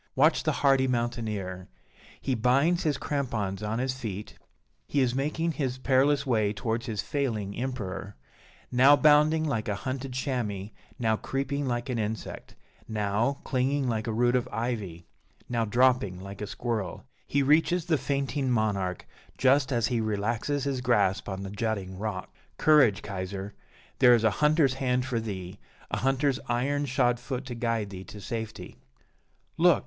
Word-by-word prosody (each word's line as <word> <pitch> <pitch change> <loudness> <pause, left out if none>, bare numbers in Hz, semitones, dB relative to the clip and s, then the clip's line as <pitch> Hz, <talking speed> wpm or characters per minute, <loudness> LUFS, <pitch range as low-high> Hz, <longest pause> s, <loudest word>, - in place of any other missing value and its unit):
Watch - - +4
the - - +1
hardy 135 -2 +3
mountaineer! 110 -7 -2 0.5
He 135 - -1
binds 135 +9 +3
his 150 -4 0
crampons 110 -11 -2
on 105 +1 -2
his 130 +1 0
feet, 105 -6 -6 0.5
he 145 - 0
is 125 -3 +2
making 150 +5 0
his 130 -5 -2
perilous 140 +2 +3
way 110 -5 +1
towards 115 +2 -2
his 110 -4 -2
failing 110 -8 -2
Emperor; 100 -6 -4 0.6
now 130 +4 +7
bounding 150 +3 +5
like 125 -9 -1
a 105 - 0
hunted 130 +4 -4
chamois; 115 -7 -2 0.3
now 110 -3 +1
creeping 140 +3 -2
like 120 0 -2
an 125 -3 -2
insect; 110 +1 -5 0.3
now 110 +5 0
clinging 135 +1 0
like 110 -2 -1
a - - 0
root 120 +3 +2
of 125 - 0
ivy; 105 -7 -3 0.4
now 115 -2 0
dropping 120 -5 +2
like 100 +2 -9
a 105 - -3
squirrel: 110 -4 -3 0.2
he 140 0 +2
reaches 160 +4 +3
the 170 -2 +2
fainting 140 0 -1
monarch 100 -6 0 0.3
just 135 +1 +3
as 120 -3 +2
he 120 -2 0
relaxes 110 +6 -1
his 135 -2 -1
grasp 105 -7 +2
on 95 0 -4
the 95 - -6
jutting 100 -3 -2
rock. 100 -1 -5 0.2
Courage, 140 -10 +5
Kaiser! 100 0 -5 0.5
there 125 -2 +8
is 115 - 0
a 110 - +4
hunter's 150 -3 +4
hand 125 -1 0
for 125 -3 -1
thee, 95 -3 -6 0.3
a - - 0
hunter's 135 0 +1
iron 140 +4 0
shod 120 -1 +2
foot 130 +1 -5
to 130 - -5
guide 115 -4 -1
thee 95 -1 -7
to 105 - -10
safety. 110 -4 -6 0.8
Look! - - +5
120 Hz, 160 wpm, -28 LUFS, 105-135 Hz, 0.8 s, there